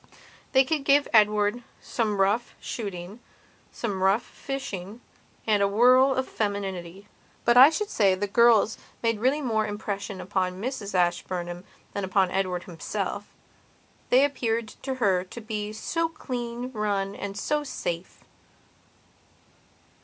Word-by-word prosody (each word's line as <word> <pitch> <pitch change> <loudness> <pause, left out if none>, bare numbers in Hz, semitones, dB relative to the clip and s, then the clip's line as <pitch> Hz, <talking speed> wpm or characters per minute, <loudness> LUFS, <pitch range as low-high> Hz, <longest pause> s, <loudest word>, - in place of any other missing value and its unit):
They 265 0 +6
could 300 +1 -1
give 280 +1 +4
Edward 210 +1 +4 0.2
some 215 -4 -2
rough 205 +5 +1
shooting, 200 -1 -6 0.5
some 200 -5 -3
rough 195 +5 +3
fishing 225 -7 -6 0.5
and 210 -2 +2
a 200 - +4
whirl 255 +6 +5
of 260 0 -1
femininity; 195 -2 -4 0.4
but 240 - +4
I 260 +4 +10
should 415 +6 -3
say 195 -3 +3
the 200 +2 -2
girls 225 +1 +4 0.2
made 230 -2 +1
really 265 +6 +2
more 220 -4 0
impression 205 -2 -4
upon 185 -1 -2
Mrs 220 -4 -4
Ashburnham 175 0 -1 0.3
than 200 - -3
upon 190 -1 +2
Edward 185 -2 -1
himself. 170 -3 -5 0.7
They 260 +3 +6
appeared 230 -5 -1
to 265 -1 -3
her 195 -7 +2
to 190 +5 -10
be 210 -2 -4
so 325 +10 -1
clean 245 -4 -5
run 200 -3 -1
and 200 0 -6
so 295 +8 0
safe. 175 -10 -5
210 Hz, 130 wpm, -26 LUFS, 195-245 Hz, 0.7 s, I